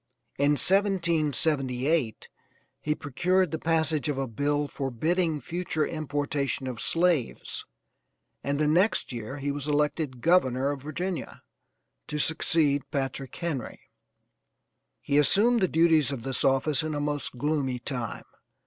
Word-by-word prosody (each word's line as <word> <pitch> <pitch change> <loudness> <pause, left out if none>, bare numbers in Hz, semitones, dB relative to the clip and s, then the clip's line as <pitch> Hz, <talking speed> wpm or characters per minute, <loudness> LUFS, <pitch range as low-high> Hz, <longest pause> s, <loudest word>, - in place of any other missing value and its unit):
In 145 +1 +4
1778 155 - +2 0.5
he 150 0 -1
procured 180 +5 0
the 160 - -3
passage 160 -2 +1
of 145 - -2
a 135 - -1
bill 145 +5 -1
forbidding 155 +5 -1
future 165 +2 -2
importation 145 -3 -2
of 125 -3 -5
slaves 165 -7 0 0.8
and 140 +1 -1
the 155 - +2
next 175 +6 +2
year 120 +4 -6
he 140 0 -2
was 145 0 -4
elected 150 -3 -1
governor 140 -6 +2
of 140 -2 -6
Virginia, 170 +5 -5 0.6
to 150 - -4
succeed 150 -2 +2
Patrick 135 -1 -3
Henry. 160 -9 -5 1.1
He 140 - +2
assumed 220 - +4
the 190 - +2
duties 160 -4 +3
of 130 -5 -5
this 135 0 -2
office 135 +2 +2
in 155 -1 -3
a - - -2
most 145 -3 -3
gloomy 140 -2 -1
time. 120 -2 -5
145 Hz, 130 wpm, -27 LUFS, 135-165 Hz, 1.1 s, In